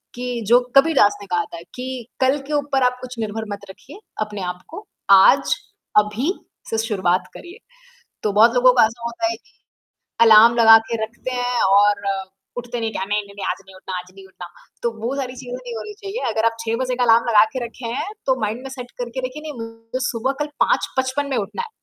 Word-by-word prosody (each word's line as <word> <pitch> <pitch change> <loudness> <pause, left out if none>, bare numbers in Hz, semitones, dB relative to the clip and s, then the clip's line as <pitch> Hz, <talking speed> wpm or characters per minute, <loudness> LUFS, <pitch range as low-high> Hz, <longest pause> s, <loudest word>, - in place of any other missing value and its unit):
कि 245 -1 -4
जो 240 +3 +6 0.2
कबीर 320 +2 +5
दास 205 -3 +4
ने - - -8
कहा 175 -1 0
था 170 - -7
कि, 250 -2 -6
"कल 265 +2 +3
के 300 - -4
ऊपर 280 -2 +1
आप 250 0 +2
कुछ 250 -1 -8
निर्भर 220 0 -3
मत 200 - -7
रखिए 275 - -13 0.2
अपने 210 -2 -4
आप 180 0 -4
को 410 +6 -9 0.3
आज, 190 -1 +6 0.4
अभी 210 - +2 0.4
से 225 - -1
शुरुआत 190 -5 0
करिए" 355 +5 -11 0.7
तो 210 - 0
बहुत 230 +4 +5
लोगों 250 +1 +6
का 240 - +6
ऐसा 230 +2 -3
होता 235 +9 -2
है - - -3
कि, - - -28 0.7
अलार्म 230 +1 +8
लगा 225 -1 +9
के 230 - -1
रखते 235 +3 -7
हैं 245 0 -1
और 200 +1 +4 0.5
उठते 245 -1 -5
नहीं, 225 -1 -1
क्या 190 - -3
नहीं, 210 +1 0
नहीं, 200 0 -15
नहीं, 200 - -5
आज - - -5
नहीं 190 - -15
उठना 185 -1 -6
आज 180 +1 -11
नहीं 195 -1 -13
उठना, 180 -2 -11 0.3
तो 235 - +1 0.2
वो 265 - -1
सारी 260 -2 -4
चीज़ें 250 -1 -7
नहीं 245 -2 -8
होनी 420 - -6
चाहिए। 400 +5 -3
अगर 220 - 0
आप 230 0 +1
6 225 +1 0
बजे 250 -1 -2
का 250 - 0
अलार्म 230 +1 +4
लगा 215 -2 +6
के 250 -2 -2
रखे 235 0 -7
हैं, 400 - -3 0.2
तो 260 -2 +1
माइंड 220 +4 -2
में 270 - -8
सेट 245 0 -7
करके 245 +2 -5
रखिए 300 +4 -10
नहीं 310 -1 -6
मुझे 225 +2 -7
सुबह 250 +3 -1
कल 295 - 0 0.2
5:55 260 +2 -1
में 260 - 0
उठना 210 - -4
है 465 - -7
235 Hz, 225 wpm, -21 LUFS, 210-255 Hz, 0.7 s, लगा